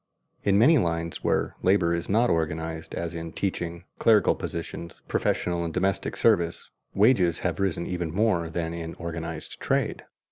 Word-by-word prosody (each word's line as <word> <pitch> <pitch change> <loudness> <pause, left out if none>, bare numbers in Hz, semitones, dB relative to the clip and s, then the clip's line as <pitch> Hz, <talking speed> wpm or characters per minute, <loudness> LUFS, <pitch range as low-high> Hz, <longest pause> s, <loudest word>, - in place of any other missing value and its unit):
In 100 0 +3
many 145 +8 +6
lines 85 -3 -2
where - - 0
labor 90 -3 +3
is 85 0 -3
not 115 +4 +3
organized, 80 0 -2
as 85 0 -3
in 85 -1 -6
teaching, 85 -3 -3 0.2
clerical 110 -2 +5
positions, 85 0 -6
professional 85 -1 0
and 85 - -3
domestic 95 +3 -1
service, 85 0 +2 0.2
wages 95 -6 +4
have 90 +2 0
risen 95 -3 0
even 90 -3 -3
more 90 -3 +1
than 85 0 -3
in 85 0 -5
organized 85 -1 -6
trade. - - 0
85 Hz, 150 wpm, -26 LUFS, 85-95 Hz, 0.2 s, many